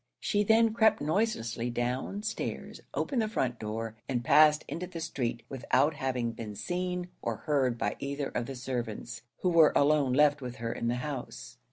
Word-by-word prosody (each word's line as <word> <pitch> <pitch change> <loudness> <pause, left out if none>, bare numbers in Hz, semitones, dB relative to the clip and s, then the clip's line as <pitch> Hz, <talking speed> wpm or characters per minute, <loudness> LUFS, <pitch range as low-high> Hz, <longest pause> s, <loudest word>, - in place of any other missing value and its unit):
She 205 - +1
then 225 +1 +4
crept 220 -1 +4
noiselessly 145 - -1
down 125 - -2
stairs, 215 0 -4
opened 260 -5 -1
the 220 - 0
front 130 - -1
door, 110 +1 -4
and 120 -3 -1
passed 150 +2 +6
into 180 +2 -4
the 175 -2 -7
street, 120 -7 -3
without 135 +3 +1
having 130 -4 -1
been 110 -2 -7
seen 180 - -3
or - - -2
heard 135 -5 +2
by 105 - -1
either 140 0 -3
of 120 - -3
the 135 - -5
servants, 120 -2 -4 0.2
who 180 - +2
were 165 -3 +6
alone 145 -2 +3
left 145 +1 +4
with 125 -1 -6
her 115 0 -3
in 115 - -3
the 120 - +1
house. 140 -4 -6
135 Hz, 180 wpm, -30 LUFS, 120-175 Hz, 0.2 s, passed